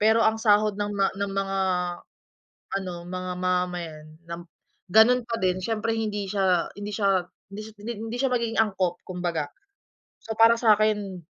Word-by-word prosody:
Pero 220 +2 +5
ang 220 - +4
sahod 210 -1 +4
ng 205 0 -2
ma 200 -1 +2
ng 200 0 -2
mga 195 0 -1 1.2
ano, 185 -2 -5
mga 185 0 -4
mamamayan, 180 -4 -2 0.2
lam 170 +1 -7 0.4
ganun 220 +5 +6
pa 230 - -1
din 185 0 +1
siyempre 225 +2 -1
hindi 210 -2 -2
siya 190 -4 +1
hindi 205 0 -6
siya 195 -4 +2 0.2
hindi 205 +2 -7
sy 220 - -11
hindi 225 0 -4
siya 265 0 +1
magiging 235 -2 0
angkop 190 -5 +1
kumbaga. 175 -4 -2 0.8
So 225 - -4
para 230 +1 +7
sa 230 -2 +4
'kin, 205 -4 0
200 Hz, 160 wpm, -26 LUFS, 185-220 Hz, 1.2 s, para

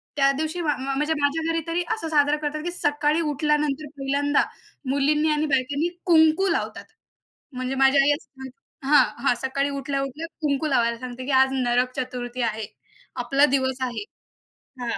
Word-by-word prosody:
त्या 275 -1 +4
दिवशी 315 +3 -2
म 330 - -3
म 290 -3 -1
म्हणजे 300 +3 0
माझ्या 290 +3 0
घरी 330 - 0
तरी 335 +2 0
असं 435 -7 -4
साजरा 295 -1 +3
करतात, 305 0 -3
की 350 - -3
सकाळी 295 -1 +1
उठल्यानंतर 300 0 0
पहिल्यांदा, 280 +1 +1 0.5
मुलींनी 295 +3 +2
आणि 300 0 +1
बायकांनी 280 +3 0 0.2
कुंकू 320 +1 +4
लावतात. - - -2 0.7
म्हणजे 255 +1 -3
माझी 270 +1 +4
आई 275 +1 +5
असे 290 - -14
म्हण 265 0 -8 0.4
हां, 295 - +7 0.2
हां. 270 - +5
सकाळी 275 +2 -1
उठल्या-उठल्या 275 +2 -3
कुंकू 295 0 0
लावायला 235 -4 +1
सांगते, 255 0 -7
की 280 - -2
"आज 265 0 +5
नरक 250 -1 +1
चतुर्थी 250 -1 -4
आहे. 220 -2 -1 0.6
आपला 280 0 +4
दिवस 260 -1 0
आहे." 250 - -2 0.8
हां. 235 -1 -2
280 Hz, 165 wpm, -24 LUFS, 260-300 Hz, 0.8 s, हां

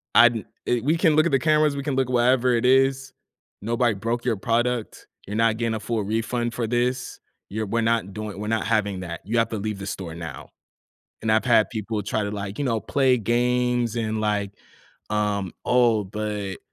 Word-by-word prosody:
"I 120 - +9
di 115 -2 -5 0.2
eh 120 - +2
we 155 +5 +2
can 165 -3 +3
look 155 +1 +4
at 170 - +1
the 135 - +3
cameras, 155 -1 +3
we 140 - -4
can 140 -2 -1
look 130 -1 +1
wherever 125 0 +3
it 120 0 +1
is. 135 +1 +3 0.5
Nobody 120 +2 +1
broke 115 +5 -3
your 115 -4 +1
product. 120 +2 -1 0.2
You're 105 - -4
not 115 0 +2
getting 115 -1 -1
a - - -3
full 110 0 -2
refund 115 +3 -1
for 115 0 -2
this. 125 +2 -1 0.3
You're 110 +2 -3
we're 115 +3 0
not 115 -4 0
doing 105 -1 -6
we're 105 - -4
not 110 0 0
having 105 -4 0
that, 85 -2 -6
you 115 +4 -1
have 115 - +2
to 110 - -3
leave 105 0 -4
the 100 - -6
store 90 -4 -5
now." 85 -1 -8 0.7
And 110 - 0
I've 110 - +3
had 115 -3 +4
people 110 -1 -3
try 105 +1 -1
to, 100 - -3
like, 100 -1 -5
you 145 - -1
know, 115 -5 0
play 130 +1 +2
games 120 +1 +1
and, 110 -1 -1
like, 105 -2 0 0.6
um, 105 -3 -1
"Oh, 120 -4 +3
but" 105 -1 -4
115 Hz, 210 wpm, -24 LUFS, 105-125 Hz, 0.7 s, I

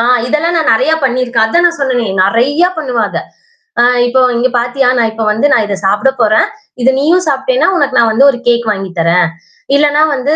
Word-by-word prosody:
ஆ, - - +2 0.2
இதெல்லாம் 305 +6 -1
நான் 320 -2 +1
நெறையா 265 +8 +1
பண்ணிருக்கேன். 245 -3 0
அதான் 345 +10 +1
நான் 340 -1 -2
சொன்னேனே! 255 -4 -1 0.2
நெறையா 270 - +1
பண்ணுவேன் 245 -7 -2
அத. - - -4 0.6
ஆ - - +5 0.2
இப்போ 255 +2 +1 0.2
இங்கே 245 +2 +1
பார்த்தியா? 245 +2 0
நான் 230 -2 +1
இப்போ 220 0 -5
வந்து 220 +7 0
நான் 260 -7 +2
இதை 200 -1 -3
சாப்பிடப் 210 +7 0
போறேன். 215 -1 +2 0.3
இதை 250 +2 +3
நீயும் 340 +6 +1
சாப்பிட்டேன்னா 405 - 0
உனக்கு 285 -5 -1
நான் 230 -1 +3
வந்து 230 +5 +2
ஒரு 250 - -6
கேக் 235 -1 +1
வாங்கி 195 -2 -4
தர்றேன். 170 +1 +2 0.5
இல்லன்னா 295 +1 +2
வந்து 275 +3 -2
250 Hz, 195 wpm, -12 LUFS, 225-290 Hz, 0.6 s, ஆ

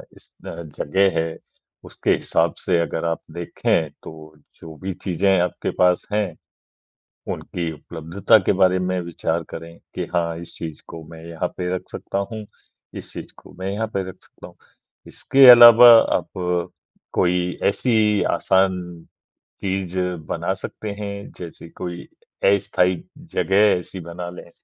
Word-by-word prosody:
इस - - -19
अ, - - -4
जगह 95 +5 0
है 80 0 -3 0.5
उसके - - -2
हिसाब - - 0
से 90 -2 0
अगर 85 0 -3
आप 80 -2 -1
देखें 85 -1 -1
तो - - -8 0.5
जो 80 -1 -10
भी 95 -1 -3
चीज़ें 95 +1 +2
आपके 90 -1 -1
पास 90 -1 +3
हैं 100 -6 -1 1.0
उनकी 85 -2 -4
उपलब्धता 85 +8 +1
के - - +4
बारे 95 -1 +3
में 90 0 -1
विचार 85 -2 -3
करें 85 0 -9 0.2
कि - - -3
हाँ, 85 -1 0
इस 85 - -8
चीज़ 80 -2 -7
को 80 - -9
मैं 80 0 -11
यहाँ 85 +1 -3
पे 90 0 -2
रख 90 - -4
सकता 100 - -4
हूँ, 110 -1 -6 0.5
इस - - -9
चीज़ - - -9
को - - -16
मैं 95 +1 -3
यहाँ 110 +2 -2
पे 95 - 0
रख 95 - -9
सकता - - -14
हूँ। - - -16 0.5
इसके 135 -1 +4
अलावा 120 0 +10 0.3
आप - - -5 0.8
कोई 90 0 0
ऐसी 105 -1 +2
आसान 95 -1 +2 0.8
चीज़ 95 -1 -2 0.3
बना - - -2
सकते 105 - -7
हैं। 100 -1 -6
जैसे 85 -1 -9
कोई 90 -1 -6 0.5
अस्थायी 90 -2 0 0.3
जगह 95 - 0 0.2
ऐसी 90 +1 -9
बना 85 +1 -7
लें 90 -1 -11
90 Hz, 150 wpm, -22 LUFS, 85-100 Hz, 1.0 s, अलावा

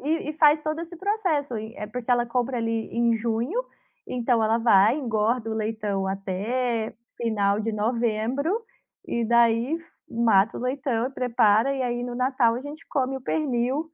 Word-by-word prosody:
e 305 +2 -1
e - - -4
faz 300 0 +5
todo 310 +1 -2
esse 340 +1 -8
processo. 360 - -1
Eh, 220 0 -6
porque 245 +3 -5
ela 240 -1 +3
compra 245 +1 -1
ali 225 -1 -2
em 235 0 +2
junho, 235 - -1 0.4
então 240 -2 +1
ela 220 +1 +2
vai, 225 0 +5
engorda 230 -3 0
o 220 - -2
leitão 210 -3 -2
até 220 +5 -2 0.2
final 210 -3 +1
de 225 +1 -1
novembro, 230 +6 0 0.6
e 235 - -1
daí 235 +5 +3 0.3
mata 225 -2 +3
o - - -6
leitão, 250 -2 -1
prepara. 235 -1 +3
E 270 -1 -2
aí, 240 0 -2
no 245 0 -4
Natal 250 -2 +2
a - - -4
gente 290 +3 -9
come 270 -1 -1
o - - -7
pernil, 270 +1 -1
235 Hz, 165 wpm, -25 LUFS, 225-265 Hz, 0.6 s, faz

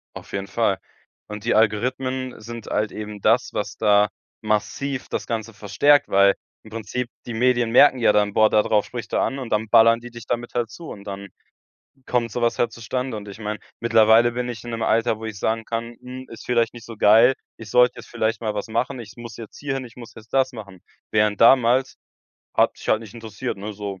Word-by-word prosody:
Auf - - -10
jeden 100 0 -4
Fall. 110 -5 +1 0.5
Und 105 0 -7
die 120 - +1
Algorithmen 125 +4 0
sind 115 0 -9
halt 105 0 -1
eben 105 -1 -7
das, 115 +5 +2
was 105 -1 -3
da 105 0 +4 0.3
massiv 125 +5 -2
das - - -4
Ganze 115 -1 -4
verstärkt, 145 +9 +3
weil 100 0 +4 0.3
im 110 - -14
Prinzip, 115 +2 -4 0.2
die 120 - -4
Medien 120 -1 +2
merken 130 +1 +6
ja 115 - +4
dann: 105 -1 +2
„Boah, 110 -1 +5
da 105 - +3
drauf 105 -2 +2
spricht 120 -3 -7
er - - +2
an“ 135 - -1
und 125 -4 -6
dann 110 +1 0
ballern 115 +1 +6
die 120 +1 -10
dich 120 -1 -10
damit 120 0 -3
halt 120 -2 0
zu 165 +8 -10
und 100 - -9
dann 100 0 -7 0.8
kommt 120 -2 0
so 120 - -3
was 120 - +1
halt 115 -2 +1
zustande. 125 +1 -4
Und 105 -1 -8
ich 100 - -10
meine, 105 -1 -4 0.2
mittlerweile 115 +1 +5
bin 125 0 -3
ich 120 -1 -7
in 120 - -6
'nem 115 -1 -4
Alter, 115 -1 +1
wo - - -7
ich 110 -2 -6
sagen 110 +2 -1
kann: 115 +1 -4
„Hm, 130 +1 -9
ist 115 - -10
vielleicht 120 -1 +1
nicht 115 -1 -11
so 115 -2 -10
geil. 115 +6 +6 0.2
Ich 110 -3 -11
sollte 125 0 +5
jetzt - - -15
vielleicht 115 -1 -1
mal 110 -2 -2
was 105 - -3
machen. 120 +3 -2
Ich 110 -2 -11
muss 120 -3 -9
jetzt 115 -2 -10
hier 140 -2 -3
hin, 135 -1 -4
ich 115 - -13
muss 120 -2 -11
jetzt 110 0 -14
das 130 -1 +3
machen.“ 100 -6 -10 0.3
Während 105 -1 +2
damals, 125 +2 +5 0.6
hat - - +3
mich - - -11
halt 110 - +3
nicht 110 -2 -12
interessiert, 110 -4 -5
ne, 105 +2 -6
so. 100 -2 -6
115 Hz, 225 wpm, -23 LUFS, 105-120 Hz, 0.8 s, merken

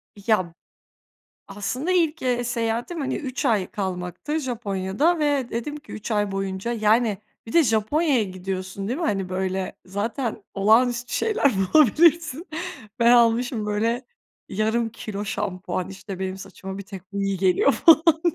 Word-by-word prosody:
Ya. 200 -4 0 1.0
Aslında 205 - -2
ilk, 330 -4 +1
eee, 245 -1 0
seyahatim, 235 +7 -2
hani, 265 -2 -1
3 265 0 -4
ay 215 -8 +2
kalmaktı 190 - -3
Japonya'da 240 - 0
ve 290 -5 +1
dedim 235 +6 -3
ki, 300 -1 -12
3 215 - -6
ay 205 -2 +1
boyunca, 195 +3 -2
yani, 220 -1 +2 0.3
bir 225 - -8
de 335 - +6
Japonya'ya 245 +5 +2
gidiyorsun, 185 0 -5
değil 255 +6 -2
mi? 345 - -2
Hani, 195 - -1
böyle, 185 0 -2
zaten 215 +4 -3
olağanüstü 240 +4 +3
şeyler 430 - +2 0.2
bulabilirsin, 315 - +4 0.5
ben 235 0 +5
almışım, 235 -1 +3
böyle, 225 +4 0 0.4
yarım 220 +3 0
kilo 210 -2 -6
şampuan, 185 -3 -3
işte, 195 -1 -8
benim 190 0 -3
saçıma 190 0 -8
bir - - -5
tek 195 -1 -11
bu 200 0 -2
iyi 195 0 0
geliyor 190 +9 +3
falan 325 +1 +6 0.2
diye. 345 - +3
220 Hz, 145 wpm, -24 LUFS, 195-260 Hz, 1.0 s, de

